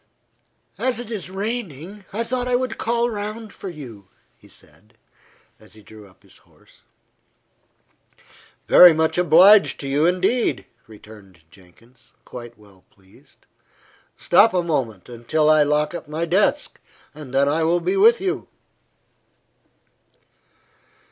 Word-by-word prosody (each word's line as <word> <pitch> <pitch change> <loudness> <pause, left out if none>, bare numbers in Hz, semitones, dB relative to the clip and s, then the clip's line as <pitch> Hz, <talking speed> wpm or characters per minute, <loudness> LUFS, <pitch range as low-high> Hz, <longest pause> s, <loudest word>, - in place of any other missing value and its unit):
"As 255 -2 -2
it 240 -2 -8
is 200 -5 -6
raining, 195 - -6
I 225 +4 -3
thought 250 +1 -3
I 250 - 0
would 250 -2 -3
call 235 +1 -1
round 215 +1 -7
for 195 - -9
you," 120 - -12 0.3
he - - -22
said, - - -20 0.6
as - - -20
he 110 -1 -18
drew 105 -1 -15
up 95 - -28
his - - -20
horse. - - -25 1.9
"Very 180 -2 +8
much 160 +2 -1
obliged 180 +5 +5
to 140 - -6
you, 145 +4 +1
indeed," 185 +7 -1 0.2
returned 105 -5 -17
Jenkins, 115 +8 -23
quite 120 -1 -11
well 100 -3 -22
pleased. 95 -1 -26 0.7
"Stop 205 +4 +3
a 180 - +1
moment, 125 - -4
until 140 +6 0
I 155 -1 +4
lock 150 +2 0
up 170 - -8
my 155 +3 -4
desk, 200 - -1 0.3
and 145 -3 -12
then 135 +1 +1
I 155 +3 0
will 165 +2 +1
be 375 - -2
with 455 +4 +4
you." 380 0 -4
160 Hz, 135 wpm, -21 LUFS, -, 1.9 s, Very